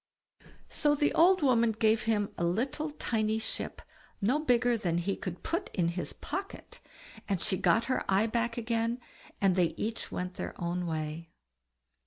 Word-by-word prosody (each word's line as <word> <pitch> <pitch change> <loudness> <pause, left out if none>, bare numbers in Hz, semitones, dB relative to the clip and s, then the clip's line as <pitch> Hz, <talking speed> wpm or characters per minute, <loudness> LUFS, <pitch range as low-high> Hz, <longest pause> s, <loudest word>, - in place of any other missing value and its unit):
So 295 -1 +2
the 295 0 +2
old 360 +1 +5
woman 235 -4 +4
gave 220 0 +3
him 210 -3 +1
a - - -3
little 250 - 0
tiny 220 -7 -1
ship, 220 - -4 0.4
no 245 +9 +2
bigger 245 -4 +3
than 175 -7 0
he 190 +3 0
could 180 -2 -6
put 340 +4 -2
in 170 -3 +2
his 175 +1 -4
pocket, 385 +6 -6 0.5
and 195 -3 +1
she 190 - +2
got 225 +5 +3
her 255 - 0
eye 195 +3 +4
back 235 +1 -1
again, 230 +1 0 0.4
and 195 -2 +3
they 170 -3 +2
each 225 +1 -3
went 180 0 -3
their - - -5
way. 165 -2 -3
220 Hz, 160 wpm, -30 LUFS, 180-245 Hz, 0.5 s, old